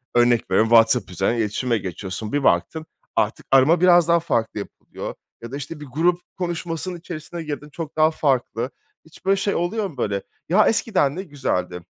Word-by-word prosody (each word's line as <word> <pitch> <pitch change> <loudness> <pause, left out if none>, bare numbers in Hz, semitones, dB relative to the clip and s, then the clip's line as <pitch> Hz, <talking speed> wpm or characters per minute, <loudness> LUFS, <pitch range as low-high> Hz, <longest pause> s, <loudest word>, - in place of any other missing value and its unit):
örnek 120 -1 +3
veriyorum, 110 - +3
WhatsApp 115 -3 +4
üzerinden 95 +7 0
iletişime 115 +2 0
geçiyorsun. 95 +2 -5
Bir 145 - +1
baktın 160 +3 +1 0.3
artık - - 0
arama 140 +6 +5
biraz 175 -2 +6
daha 170 0 +4
farklı 115 -9 -1
yapılıyor. - - -8 0.3
Ya 115 +1 -8
da, 140 - -4
işte, 145 +2 -7
bir 150 - -8
grup 170 +6 +1 0.2
konuşmasının 175 0 -3
içerisine 170 0 -7
girdin 150 -1 -6
çok 155 0 -7
daha 155 +1 +5
farklı. 130 -5 0 0.4
Hiç 160 - -18
böyle 195 +1 +4
şey 200 +1 0
oluyor 195 +5 -1
mu, 140 - -15
böyle? 100 -4 -1 0.3
Ya, 210 +5 +5
eskiden 155 -11 +2
ne 190 - -4
güzeldi. 130 - -3
145 Hz, 175 wpm, -22 LUFS, 115-170 Hz, 0.4 s, biraz